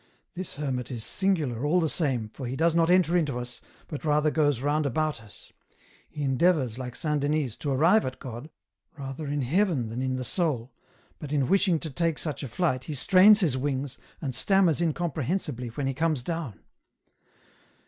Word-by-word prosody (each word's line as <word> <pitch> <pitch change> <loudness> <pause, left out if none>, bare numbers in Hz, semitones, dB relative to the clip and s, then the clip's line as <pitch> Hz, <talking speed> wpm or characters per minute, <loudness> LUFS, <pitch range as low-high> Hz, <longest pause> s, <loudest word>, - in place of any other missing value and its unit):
This 185 0 -6
hermit 135 -4 -3
is 120 -4 -5
singular, 155 -12 0
all 160 +5 +3
the 165 - +1
same, 135 - -1
for 130 +3 -7
he 125 - -3
does 165 +3 +2
not 165 0 +3
enter 180 -1 +4
into 150 -7 +1
us, 125 0 -7 0.3
but 150 - -6
rather 150 0 +2
goes 145 -5 +2
round 145 +2 0
about 155 -1 -1
us; 105 -2 -15 0.6
he 150 -2 -5
endeavours, 135 -3 +2
like 125 -1 -6
Saint 150 -2 -1
Denys, 145 -5 0
to 145 - -3
arrive 165 +11 +4
at 130 0 -4
God, 125 +3 -8 0.5
rather 135 +2 -6
in 145 0 -1
heaven 155 - +1
than 120 +3 -4
in 130 0 -1
the 130 - -3
soul, 130 -5 -1 0.5
but 145 -2 -7
in 140 -4 +1
wishing 190 -3 +3
to 160 - -4
take 165 +3 0
such 155 -3 -3
a 140 - -4
flight, 130 0 -1
he 155 - -4
strains 200 - +6
his 155 -8 +2
wings, 135 -1 -3 0.2
and 135 -5 -3
stammers 175 +3 +3
incomprehensibly 155 -4 -2
when 130 +5 -4
he 135 - 0
comes 155 -2 0
down. 160 - -5
145 Hz, 185 wpm, -27 LUFS, 130-165 Hz, 0.6 s, strains